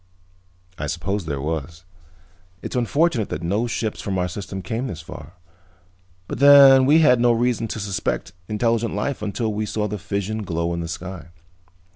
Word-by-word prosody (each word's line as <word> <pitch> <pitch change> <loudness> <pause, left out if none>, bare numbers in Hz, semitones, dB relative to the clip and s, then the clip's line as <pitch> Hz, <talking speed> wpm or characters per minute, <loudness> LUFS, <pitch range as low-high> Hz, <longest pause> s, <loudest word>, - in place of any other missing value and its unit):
"I 75 - -3
suppose 90 +5 -3
there 70 -3 -3
was. 80 +3 -5 0.8
It's - - -5
unfortunate 125 - +1
that 75 - -5
no 100 +8 0
ships 110 -2 -3
from 95 -2 -3
our 90 0 0
system 95 +1 -6
came 120 +3 -3
this 85 -6 -6
far, 80 0 -11 0.9
but - - -5
then 140 -2 +8
we 155 +3 +6
had 125 -6 +5
no 120 0 +4
reason 120 0 0
to 110 - -5
suspect 100 -4 -3
intelligent 115 0 0
life 125 +5 -2
until 105 +1 -2
we 105 +1 -2
saw 105 +1 -2
the 105 0 -5
fission 100 +3 -3
glow 85 -3 -2
in 85 - -3
the 85 - -4
sky." 90 +2 -7
105 Hz, 170 wpm, -22 LUFS, 85-120 Hz, 0.9 s, then